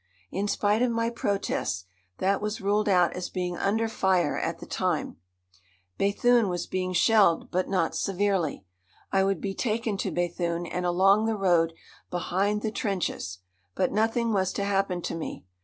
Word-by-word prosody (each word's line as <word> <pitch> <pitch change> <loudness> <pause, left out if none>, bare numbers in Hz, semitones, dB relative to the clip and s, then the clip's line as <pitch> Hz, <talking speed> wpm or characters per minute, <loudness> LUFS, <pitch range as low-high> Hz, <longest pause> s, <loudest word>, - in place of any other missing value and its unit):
In 200 +3 -1
spite 205 +2 +1
of 250 - +3
my 230 0 0
protests, 200 - -2 0.3
that 195 +1 +1
was 210 +2 -2
ruled 210 +1 +1
out 180 -3 +4
as 180 0 -4
being 180 -1 -3
under 220 +5 +1
fire 190 -7 +1
at - - -2
the - - -10
time. - - -2 0.8
Béthune 220 +2 +3
was 175 -1 -2
being 185 0 -2
shelled, 195 -1 +3
but 185 +1 0
not 175 -4 +1
severely. 190 - 0 0.5
I 195 0 +3
would 195 -3 +1
be 195 +2 -3
taken 220 -1 -1
to - - -2
Béthune 175 0 -1
and 180 0 -1
along 195 +4 +4
the 225 -1 0
road 170 -4 +3 0.4
behind 195 +4 0
the 220 - -1
trenches. 180 - -3 0.3
But 185 - +1
nothing 225 +2 +1
was 190 -2 +1
to 200 - -2
happen 195 -3 0
to - - -3
me. 165 - -6
195 Hz, 165 wpm, -27 LUFS, 180-210 Hz, 0.8 s, out